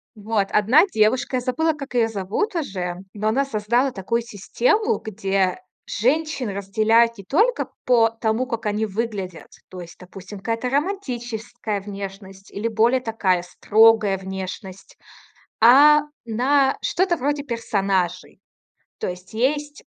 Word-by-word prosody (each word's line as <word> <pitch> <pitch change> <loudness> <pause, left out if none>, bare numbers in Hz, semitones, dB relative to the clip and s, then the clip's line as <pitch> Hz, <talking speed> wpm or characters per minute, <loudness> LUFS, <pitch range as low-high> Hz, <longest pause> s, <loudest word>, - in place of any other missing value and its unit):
Вот 210 -1 -1
одна 240 - +5
девушка, 245 - +1
я - - -2
забыла, 290 +6 0
как 275 -3 -9
её 235 -2 +3
зовут 225 - -3
уже, 185 - -3 0.2
но 215 +1 -3
она 275 +5 +1
создала 240 +2 0
такую 230 +3 -2
систему, 245 - 0
где 195 -3 -1 0.3
женщин 275 +1 -1
разделяют 220 +4 +2
не 200 - -10
только 435 - +1 0.2
по 230 -3 +4
тому, 225 +2 -1
как 230 -4 -4
они 210 +1 0
выглядят. 205 -4 -5 0.2
То 185 - -9
есть, 170 -1 -11
допустим, 190 +2 -11
какая-то 230 +4 -2
романтическая 240 - -3
внешность 195 -1 -9
или 210 +3 -3
более 230 +3 +2
такая 195 -7 0
строгая 215 +1 +3
внешность, 190 0 -8 0.6
а 290 +5 +7 0.2
на 265 +4 +2
что-то 350 0 0
вроде 285 +2 -1
персонажей. 195 - -2 0.6
То - - -2
есть 180 +3 -8
есть 290 +5 -1
225 Hz, 130 wpm, -22 LUFS, 195-260 Hz, 0.6 s, а